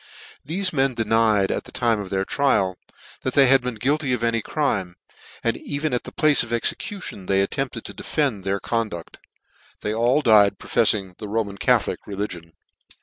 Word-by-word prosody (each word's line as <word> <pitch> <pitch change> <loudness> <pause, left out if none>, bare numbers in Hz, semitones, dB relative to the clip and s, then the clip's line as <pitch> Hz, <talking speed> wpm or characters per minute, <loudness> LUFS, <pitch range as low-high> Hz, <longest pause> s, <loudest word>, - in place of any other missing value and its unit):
Thefe 185 +3 0
men 135 -3 +1
denied, 110 -3 +2
at - - -3
the - - -12
time 115 -3 +1
of 100 -2 -6
their 95 0 -1
trial, 95 -10 +1 0.5
that 130 - -3
they 140 - +7
had 135 0 +5
been 125 -1 -4
guilty 135 +4 0
of 120 -2 -2
any 115 -1 +1
crime 95 - -1
j - - -29 0.3
and - - +1
even 145 0 -3
at 125 - -1
the - - -8
place 155 -3 +3
of 115 - -4
execution 120 - -3
they 95 0 +3
attempted 130 +1 -3
to - - -8
defend 135 -11 -1
their 100 +1 -1
conduct. 110 -8 -4 0.6
They 105 - -1
all 120 +6 +2
died 105 -3 +5
profefiing 95 -3 +1
the 105 - -6
Ro 110 +2 0
man 100 -1 -10
Catholic - - +2
religion. 90 -5 -5
115 Hz, 185 wpm, -23 LUFS, 100-135 Hz, 0.6 s, they